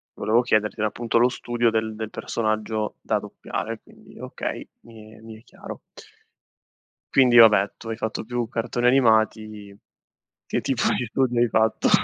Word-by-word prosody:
volevo 115 Hz, +3 st, +2 dB
chiederti, 110 Hz, -4 st, 0 dB
era 110 Hz, -, +1 dB
appunto 115 Hz, +1 st, -2 dB
lo 120 Hz, +2 st, +4 dB
studio 120 Hz, -1 st, -1 dB
del 110 Hz, -1 st, -2 dB
del 110 Hz, -1 st, -5 dB
personaggio 110 Hz, -1 st, -3 dB
da -, -, 0 dB
doppiare, -, -, -6 dB
quindi -, -, -18 dB
okay, -, -, -6 dB
mi 110 Hz, -2 st, -15 dB
è -, -, -16 dB
mi 110 Hz, -1 st, -11 dB
è 115 Hz, -, -23 dB
chiaro. -, -, -10 dB, 1.4 s
Quindi 125 Hz, -3 st, +5 dB
vabbè 105 Hz, -4 st, +6 dB
tu 115 Hz, -, -10 dB
hai 115 Hz, -, -4 dB
fatto 110 Hz, 0 st, -4 dB
più 120 Hz, 0 st, -3 dB
cartoni 120 Hz, +1 st, -1 dB
animati, 110 Hz, -5 st, +1 dB, 0.7 s
che -, -, -2 dB
tipo -, -, -1 dB
di 125 Hz, -, -2 dB
studi 125 Hz, 0 st, 0 dB
hai 120 Hz, -1 st, +3 dB
fatto? 110 Hz, +1 st, +1 dB
110 Hz, 160 wpm, -23 LUFS, 110-120 Hz, 1.4 s, vabbè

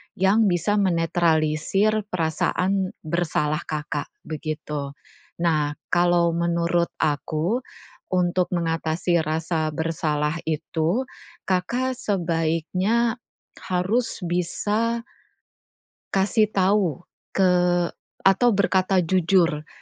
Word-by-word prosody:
yang 195 Hz, +4 st, +3 dB
bisa 180 Hz, +3 st, +1 dB
menetralisir 170 Hz, +3 st, +1 dB
perasaan 180 Hz, +3 st, 0 dB
bersalah 155 Hz, -2 st, 0 dB
Kakak, 150 Hz, -1 st, -3 dB, 0.2 s
begitu. 150 Hz, -2 st, -4 dB, 0.5 s
Nah, 155 Hz, -3 st, +2 dB, 0.2 s
kalau 175 Hz, -1 st, +4 dB
menurut 170 Hz, 0 st, +1 dB
aku, 160 Hz, -, 0 dB, 0.5 s
untuk 180 Hz, 0 st, +1 dB
mengatasi 165 Hz, 0 st, 0 dB
rasa 155 Hz, 0 st, -1 dB
bersalah 155 Hz, -1 st, -1 dB
itu, 160 Hz, -, -1 dB, 0.4 s
Kakak 240 Hz, +8 st, 0 dB
sebaiknya 185 Hz, +4 st, 0 dB, 0.5 s
harus 190 Hz, +7 st, 0 dB
bisa 205 Hz, +7 st, 0 dB, 1.2 s
kasih 205 Hz, +3 st, +3 dB
tahu 190 Hz, -4 st, +1 dB, 0.3 s
ke 190 Hz, -2 st, +4 dB, 0.7 s
atau 195 Hz, +6 st, +5 dB
berkata 190 Hz, -1 st, +2 dB
jujur 170 Hz, -3 st, +2 dB
175 Hz, 80 wpm, -24 LUFS, 160-195 Hz, 1.2 s, atau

